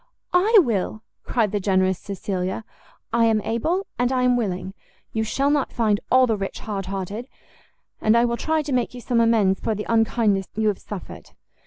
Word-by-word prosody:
"I 410 +6 +5
will!" 215 -2 -2 0.2
cried 220 -5 +1
the 205 - 0
generous 190 -1 +1
Cecilia; 190 0 -4 0.5
"I 235 -1 +4
am 220 -1 +3
able, 320 - -1
and 245 +1 +2
I 255 -1 +1
am 250 0 +4
willing; 190 -5 -2 0.4
you 220 - 0
shall 275 +6 +1
not 290 -2 +1
find 215 -3 +1
all 255 0 +6
the 225 -3 +1
rich 195 -1 -5
hardhearted, 195 +2 -4 0.7
and 215 +2 +4
I 235 - +4
will 235 0 0
try 315 +5 0
to 290 - -5
make 250 0 0
you - - -7
some 235 -1 +1
amends 215 -5 +3
for 220 - -1
the 210 - -4
unkindness 225 -3 +2
you 220 0 +2
have 200 - -2
suffered." 200 -4 -9
220 Hz, 185 wpm, -23 LUFS, 195-245 Hz, 0.7 s, all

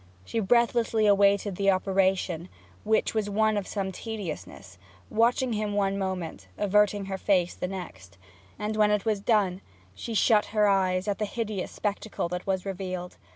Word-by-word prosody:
She 225 - -2
breathlessly 230 0 +2
awaited 200 -1 +3
the 200 0 +2
operation, 185 -2 +1 0.3
which 220 +1 +1
was 215 -2 -1
one 215 +1 +2
of 205 -2 -2
some 195 -2 -3
tediousness, 185 - -7 0.3
watching 240 +2 +2
him 210 -1 -2
one 195 -1 +1
moment, 180 - -4
averting 205 0 +2
her 190 0 -4
face 180 -3 +2
the - - -4
next; 180 - -8 0.4
and 210 +1 -3
when 210 -1 +4
it 210 0 +1
was 215 -2 +1
done 200 -4 +1 0.3
she 225 - -6
shut 215 0 +4
her 210 0 +5
eyes 190 -1 +2
at 205 - -1
the 210 - 0
hideous 215 -3 -3
spectacle 205 -2 -3
that 180 +2 -5
was 190 -1 -1
revealed. 185 -2 -5
200 Hz, 160 wpm, -27 LUFS, 185-215 Hz, 0.4 s, her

